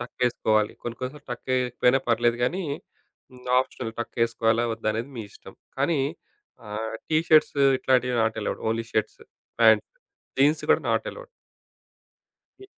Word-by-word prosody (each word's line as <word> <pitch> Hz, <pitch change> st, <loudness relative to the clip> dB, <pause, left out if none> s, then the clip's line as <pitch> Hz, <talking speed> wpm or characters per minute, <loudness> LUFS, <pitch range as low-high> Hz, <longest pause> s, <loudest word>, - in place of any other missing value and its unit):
టక్కేసుకోవాలి. 115 Hz, -3 st, 0 dB
కొన్ని 120 Hz, 0 st, -5 dB
కొన్నిసార్లు 135 Hz, +3 st, -6 dB
టక్ 120 Hz, -, -9 dB
ఏయకపోయినా 125 Hz, +1 st, +2 dB
పర్లేదు 120 Hz, 0 st, +2 dB
గానీ, 185 Hz, +9 st, -1 dB, 0.7 s
హ్మ్. 125 Hz, 0 st, -15 dB, 0.2 s
ఆప్షనల్ 125 Hz, -3 st, -5 dB
టక్కేసుకోవాలా, 115 Hz, 0 st, +1 dB
వద్దా, 110 Hz, -1 st, -3 dB
అనేది 115 Hz, +5 st, -4 dB
మీ 110 Hz, -, -4 dB
ఇష్టం. -, -, -14 dB, 0.2 s
కానీ 145 Hz, +1 st, +1 dB, 0.7 s
ఆహ్, 110 Hz, +2 st, -4 dB
టీ 155 Hz, -, +2 dB
షర్ట్స్ 155 Hz, -2 st, +5 dB, 0.2 s
ఇట్లాంటియి 125 Hz, -1 st, +2 dB
not 110 Hz, -, 0 dB
allowed. -, -, -3 dB
Only 115 Hz, 0 st, -1 dB
shirts, 110 Hz, 0 st, -1 dB, 0.4 s
pant. -, -, +6 dB, 0.5 s
Jeans 145 Hz, +3 st, +4 dB
గూడా -, -, +4 dB
నాట్ -, -, +1 dB
అలౌడ్. -, -, -11 dB, 1.4 s
ఇ -, -, -11 dB
120 Hz, 135 wpm, -25 LUFS, 115-135 Hz, 1.4 s, pant